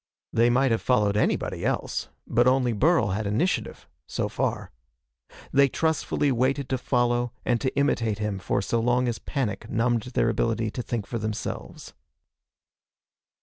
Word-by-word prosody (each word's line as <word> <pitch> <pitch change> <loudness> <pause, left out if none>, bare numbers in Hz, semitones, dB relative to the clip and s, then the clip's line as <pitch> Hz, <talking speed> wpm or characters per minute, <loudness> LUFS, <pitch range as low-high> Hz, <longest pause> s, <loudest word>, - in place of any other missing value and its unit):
They 115 +1 +4
might 130 +1 +3
have 115 - +1
followed 105 -5 +2
anybody 105 - 0
else, - - -2 0.2
but 120 +1 +2
only 125 -2 +3
Burl 155 - +3
had 100 +3 -2
initiative 145 - -1 0.2
so - - -2
far. - - -2 0.8
They 140 0 +5
trustfully 160 -1 0
waited 130 +2 0
to 130 - 0
follow 120 -1 +1
and 120 -2 +1
to 130 - -1
imitate 115 -7 +1
him 105 -2 -2
for 95 - -1
so 115 - 0
long 125 +2 +2
as 115 -2 -2
panic 110 -5 -3
numbed 115 0 +1
their 115 - +3
ability 110 -1 0
to 125 - -4
think 115 -3 -3
for 115 +3 -4
themselves. 110 0 -5
120 Hz, 150 wpm, -26 LUFS, 110-130 Hz, 0.8 s, They